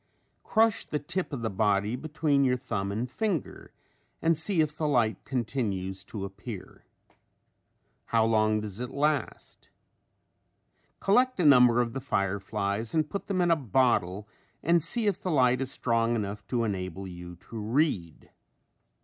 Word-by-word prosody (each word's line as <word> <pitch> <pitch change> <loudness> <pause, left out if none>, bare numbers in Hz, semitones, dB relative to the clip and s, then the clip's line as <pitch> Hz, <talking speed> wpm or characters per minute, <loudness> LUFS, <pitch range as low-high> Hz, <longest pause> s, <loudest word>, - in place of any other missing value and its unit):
Crush 225 -1 +2
the 150 - -3
tip 175 +5 -3
of 130 -5 -4
the 110 - 0
body 105 +2 +1
between 145 0 +1
your 125 -1 +2
thumb 100 -6 -3
and 110 +5 -2
finger 180 - -3 0.5
and 165 0 +3
see 160 +3 -1
if 150 -1 +1
the 155 -1 -1
light 120 -6 +1
continues 105 -7 -2
to 100 -3 -5
appear. 100 +1 -9 1.2
How 115 -1 +2
long 110 -1 +2
does 105 0 -6
it 125 0 -4
last? 145 -2 -2 1.3
Collect 250 +4 +3
a 175 - +2
number 125 -4 +7
of 115 -1 -2
the 135 - -4
fireflies 100 - -2
and 155 -2 +1
put 200 - -4
them 190 -3 0
in 175 -1 +3
a - - +6
bottle 110 - +1 0.4
and 170 +1 +4
see 220 +8 -1
if 200 -2 0
the 185 - -3
light 130 -5 +3
is 135 - -2
strong 115 -2 0
enough 105 -1 -4
to 120 -2 0
enable 95 -3 -3
you 90 -1 -9
to 110 +6 -9
read. 105 - -1
120 Hz, 155 wpm, -28 LUFS, 105-150 Hz, 1.3 s, number